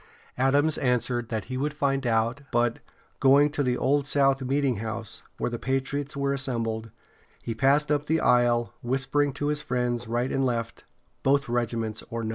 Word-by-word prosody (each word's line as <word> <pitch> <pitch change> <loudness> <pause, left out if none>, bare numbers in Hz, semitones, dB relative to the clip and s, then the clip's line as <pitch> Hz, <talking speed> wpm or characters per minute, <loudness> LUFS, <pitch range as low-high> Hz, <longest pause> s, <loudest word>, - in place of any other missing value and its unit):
Adams 145 +4 +2
answered 125 -2 0
that 110 -3 -2
he 130 +2 -5
would 145 +2 -2
find 135 -3 0
out, 115 +4 +1
but, 120 -1 +1 0.4
going 140 +2 +5
to 145 - -1
the 125 -2 +1
Old 140 +1 +1
South 135 -1 +3
Meetinghouse, 120 -5 -2 0.2
where - - -2
the 120 - -4
patriots 135 +2 -2
were 140 0 0
assembled, 115 -5 -2 0.5
he 115 - -3
passed 140 +5 +2
up 145 0 0
the 160 +1 +2
aisle, 120 -3 +3
whispering 135 +3 0
to 145 +1 -2
his 150 0 -1
friends 120 -1 -1
right 120 +3 -1
and 135 - +1
left: 115 -3 -2 0.4
"Both 140 +1 +2
regiments 115 -2 -2
or 115 0 -4
none." 110 - -2
130 Hz, 170 wpm, -26 LUFS, 120-140 Hz, 0.5 s, going